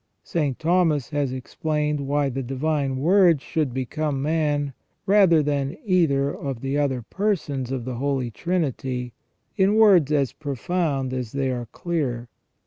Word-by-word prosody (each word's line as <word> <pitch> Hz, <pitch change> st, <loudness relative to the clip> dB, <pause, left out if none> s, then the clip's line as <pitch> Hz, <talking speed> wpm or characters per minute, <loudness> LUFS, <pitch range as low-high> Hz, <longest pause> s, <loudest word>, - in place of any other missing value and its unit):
St. 145 Hz, -6 st, -1 dB
Thomas 160 Hz, -4 st, +1 dB
has 145 Hz, -3 st, 0 dB
explained 150 Hz, +3 st, -2 dB
why 145 Hz, 0 st, +1 dB
the 135 Hz, +1 st, -3 dB
Divine 135 Hz, +1 st, -1 dB
Word 170 Hz, +2 st, +4 dB
should 150 Hz, -1 st, -2 dB
become 135 Hz, +3 st, -2 dB
man, 145 Hz, -1 st, 0 dB, 0.3 s
rather 190 Hz, -6 st, +5 dB
than 140 Hz, -1 st, -1 dB
either 150 Hz, -8 st, +2 dB
of 135 Hz, -4 st, -5 dB
the 135 Hz, +1 st, -2 dB
other 135 Hz, -4 st, 0 dB
persons 145 Hz, -, -2 dB
of 130 Hz, -3 st, -3 dB
the 125 Hz, -2 st, -4 dB
Holy 135 Hz, -2 st, -1 dB
Trinity, 130 Hz, -6 st, -2 dB, 0.4 s
in 195 Hz, +1 st, +3 dB
words 195 Hz, -9 st, +5 dB
as 140 Hz, -4 st, +1 dB
profound 140 Hz, -1 st, -2 dB
as 125 Hz, -4 st, -4 dB
they 135 Hz, -1 st, 0 dB
are 120 Hz, -2 st, -4 dB
clear. 125 Hz, -6 st, -3 dB
145 Hz, 140 wpm, -24 LUFS, 130-160 Hz, 0.4 s, rather